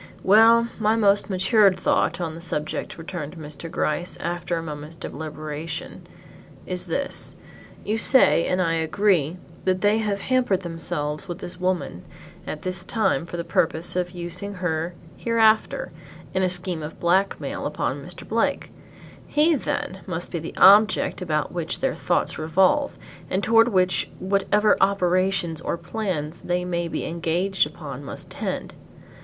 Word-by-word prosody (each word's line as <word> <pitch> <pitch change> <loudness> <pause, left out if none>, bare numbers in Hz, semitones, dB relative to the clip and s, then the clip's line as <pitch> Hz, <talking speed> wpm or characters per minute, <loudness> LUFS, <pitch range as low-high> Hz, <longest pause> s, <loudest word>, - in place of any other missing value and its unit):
"Well 225 +4 +6
my 215 0 +3
most 205 -2 +3
matured 190 0 +4
thought 170 -2 +1
on 165 -3 -3
the 165 - -9
subject," 155 -3 -4
returned 165 -2 -6
Mr. 155 +1 -7
Gryce, 170 +3 -1
after 175 0 -2
a 165 - -3
moment's 150 0 -7
deliberation, 155 +1 -6 0.6
"is 180 0 -3
this, 280 +12 -3 0.5
you 220 +2 0
say, 255 -9 +4
and 180 - +1
I 165 -2 +2
agree, 165 0 +1 0.3
that 185 -1 +1
they 210 +2 +3
have 205 -2 -1
hampered 250 -7 +1
themselves 155 -1 -3
with 175 -2 -5
this 180 0 -9
woman 180 - -1 0.4
at 155 - -5
this 185 0 -3
time 190 - 0
for 175 - -6
the 170 - -2
purpose 165 0 0
of 180 -1 0
using 180 +3 -5
her 175 -1 -2 0.2
hereafter 230 - +2 0.4
in 190 - +1
a 185 - +2
scheme 180 -2 -3
of 150 +1 -7
black 190 +3 +2
mail - - -3
upon - - -2
Mr. - - -11
Blake. - - 0 0.6
He, 310 +3 +3
then, 190 -8 -2
must 175 -1 -4
be 170 - -2
the 165 - -8
object 205 +1 +6
about 155 -5 -1
which 170 -2 -3
their - - 0
thoughts - - -1
revolve 185 - +2 0.3
and 190 +2 0
toward 225 +1 +5
which 185 -5 +1
whatever 200 +2 +2
operations 185 -3 +1
or 170 - -2
plans 175 -7 -3
they 180 0 -1
may 170 -1 -1
be - - -3
engaged 170 +2 +1
upon 145 -3 -8
must 140 - -6
tend. - - -4
180 Hz, 150 wpm, -24 LUFS, 165-200 Hz, 0.6 s, Well